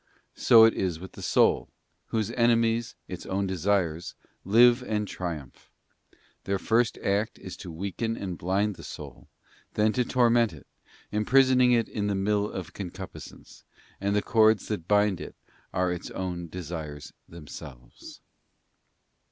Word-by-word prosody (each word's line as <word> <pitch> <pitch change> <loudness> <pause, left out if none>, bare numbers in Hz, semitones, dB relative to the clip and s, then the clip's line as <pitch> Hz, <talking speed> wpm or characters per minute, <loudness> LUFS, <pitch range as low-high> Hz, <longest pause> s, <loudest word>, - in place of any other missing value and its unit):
So 115 -1 +7
is 95 -6 +1
it - - -15
with 95 - -9
the - - -11
soul, - - +2 0.4
whose 110 -1 -1
enemies, 115 -1 +2
its - - -7
own 95 +1 -1
de 95 0 -2
sires, 85 -3 0 0.3
live 120 +5 +5
and 105 -4 -2
triumph: 80 -10 -6 0.8
their 100 0 0
first 115 +4 +1
act 100 +2 0
is 95 -1 -8
to 90 - -8
weaken 100 +7 -3
and 95 -3 -4
blind 95 +3 -1
the - - -11
soul, - - -10 0.5
then 110 0 +2
to 125 - +1
torment 120 -4 +3
it, 75 - -13 0.5
imprisoning 125 +3 +4
it 115 -2 +3
in 105 -1 -3
the 100 - 0
mill 105 +1 0
of 95 - -7
concupiscence, 95 -4 -9 0.4
and 100 +1 0
the 105 - +1
cords 110 -2 +3
that 90 -6 -3
bind 105 -2 +2
it - - -8 0.4
are 90 -1 0
its 90 - -6
own® 90 -2 -4
desires 80 -5 -7 0.2
themselves. 70 -6 -11
100 Hz, 145 wpm, -27 LUFS, 90-115 Hz, 0.8 s, So